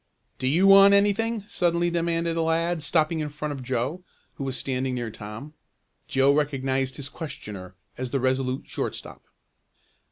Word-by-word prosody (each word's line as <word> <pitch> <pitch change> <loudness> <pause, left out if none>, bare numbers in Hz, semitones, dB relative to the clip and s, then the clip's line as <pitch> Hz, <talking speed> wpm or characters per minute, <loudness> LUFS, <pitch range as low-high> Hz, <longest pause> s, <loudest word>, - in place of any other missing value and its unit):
"Do 130 - -1
you 165 +8 +3
want 195 0 +8
anything?" 210 +2 +1
suddenly 175 -2 +1
demanded 170 0 0
a 165 - 0
lad 165 +1 0
stopping 155 +2 +2
in 150 -1 -2
front 150 +1 -5
of 140 -2 -5
Joe, 130 +7 -2 0.3
who 140 - -6
was 135 -1 -3
standing 130 -1 -2
near 120 -2 -3
Tom. 105 +8 -9 0.5
Joe 135 +1 +3
recognized 135 -3 0
his 140 -2 -5
questioner 100 - -8 0.2
as 130 -1 -3
the 135 - -1
Resolute 130 0 0
shortstop. - - -5
145 Hz, 155 wpm, -25 LUFS, 130-170 Hz, 0.5 s, want